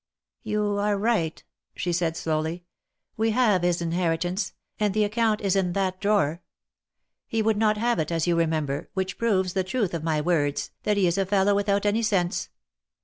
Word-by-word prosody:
"You 210 -2 -1
are 205 0 +1
right," 200 -7 0 0.3
she 175 - -2
said, 165 -1 0
slowly; 160 +2 -2 0.5
"we 225 +1 +2
have 215 -5 +3
his 175 -1 +1
inheri* 165 -1 0
tance, 180 +4 -2 0.3
and 210 -2 +1
the 215 - +3
account 215 0 +1
is 200 -2 +1
in 185 -3 +1
that 185 -1 -1
drawer. 195 -6 +1 0.9
He 225 -1 0
would 220 -1 +2
not 215 0 +2
have 235 -2 +1
it, 155 +1 -1
as 165 -2 0
you 175 -1 +2
remember, 155 -4 -1
which 190 -1 -2
proves 190 -6 +1
the 190 - +1
truth 195 0 -1
of 165 -2 -3
my 160 -2 +1
words, 150 -3 0
that 210 -1 +2
he 195 - +3
is 175 +2 +1
a 195 - +2
fellow 200 0 +3
without 200 0 +1
any 210 +2 +2
sense. 195 -4 0
190 Hz, 190 wpm, -25 LUFS, 170-210 Hz, 0.9 s, have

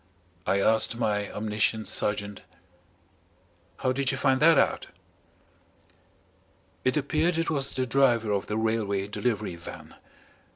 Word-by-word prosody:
I 100 - +2
asked 110 +3 +2
my 105 -3 -1
omniscient 110 +1 -1
sergeant: 105 -1 -2 1.4
"How 130 - 0
did 135 0 +1
you 135 - -3
find 130 -1 +2
that 160 0 +6
out?" - - +1 2.0
It 130 +3 +1
appeared 155 +4 +1
it 165 0 0
was 140 -3 -1
the 130 0 0
driver 120 -4 +2
of 100 -1 -1
the 105 - -2
Railway 110 -3 0
Delivery 105 -2 -2
Van. 85 - -11
115 Hz, 125 wpm, -27 LUFS, 105-135 Hz, 2.0 s, that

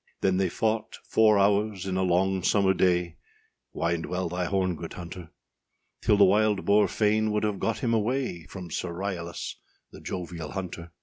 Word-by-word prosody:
â - - -37
Then 95 -1 +2
they 95 -1 +1
fought 110 +3 -1
four 110 -2 +4
hours 100 -1 +2
in 95 -1 -2
a 95 - +1
long 95 +1 +2
summer 95 +1 +3
day, 90 -2 +1 0.5
Wind 85 0 -1
well 90 -1 -2
thy 90 +1 -2
horn, 95 -1 0
good 80 +1 -7
hunter; 85 -1 -8 0.7
Till 105 - +3
the 100 - +7
wild 105 +1 +2
boar 105 +1 +4
fain 110 0 +1
would 105 0 0
have 105 -3 -1
got 115 -1 -2
him 115 -2 +1
away 110 -6 -1
From 90 -3 -9
Sir 90 +2 -3
Ryalas, 85 -2 -4 0.3
the - - -12
jovial 85 -4 -6
hunter. 85 -3 -6
95 Hz, 180 wpm, -27 LUFS, 90-105 Hz, 0.7 s, the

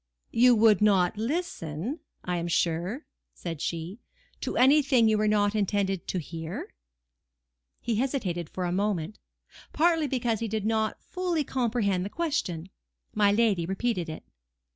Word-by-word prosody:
"You 245 +1 +5
would 215 -2 +5
not 195 -4 +4
listen, 230 - -3 0.3
I 180 0 -1
am 170 0 -2
sure," 175 - -1 0.3
said 165 -4 -6
she, 170 +6 -4 0.4
"to - - -3
anything 265 -3 +5
you 220 - +3
were 215 0 +1
not 205 -1 +2
intended 200 -3 0
to - - -2
hear?" 165 0 -6 1.1
He 230 -3 -1
hesitated 200 - -1
for 185 - -3
a 175 - -1
moment, 195 -1 -1 0.5
partly 325 -1 +3
because 240 -4 0
he 230 - -2
did 215 -1 -2
not 220 0 0
fully 355 -4 -1
comprehend 230 -8 0
the 195 - -4
question. 190 - -2 0.4
My 205 -1 +4
lady 205 -6 +2
repeated 190 -3 -1
it. 155 - -7
210 Hz, 140 wpm, -27 LUFS, 180-245 Hz, 1.1 s, You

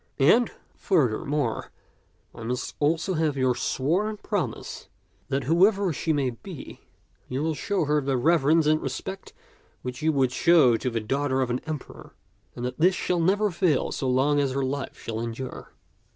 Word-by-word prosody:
And, 220 - +5 0.2
furthermore, 145 - 0 0.6
I 115 - -11
must 120 +2 -3
also 165 +5 +1
have 155 -4 0
your 130 -1 +2
sworn 180 - -1
pro - - -1
mise - - -9 0.4
that, 140 -1 -1
whoever 190 - +3
she 160 - -1
may 140 -4 +1
be, 160 +6 -10 0.5
you 130 +3 -2
will 160 0 0
show 185 +4 -1
her 150 +1 +2
the 135 -1 0
reverence 160 +3 +3
and 155 +1 +3
respect 190 0 -5 0.5
which 125 +1 -5
you 160 +1 +3
would 135 -4 +2
show 150 -5 +5
to 125 +3 -1
the 115 -2 -2
daughter 135 +4 0
of 125 - -2
an 125 - -1
emperor, 155 -3 -7 0.4
and 120 - -4
that 125 - -5
this 180 +3 +4
shall 180 -1 0
never 200 +5 +2
fail 170 -5 +1
so 130 - -2
long 140 +3 +3
as 140 -2 +1
her 135 0 -1
life 140 +1 -4
shall 110 -1 -5
endure." 115 +3 -6
145 Hz, 170 wpm, -26 LUFS, 130-170 Hz, 0.6 s, And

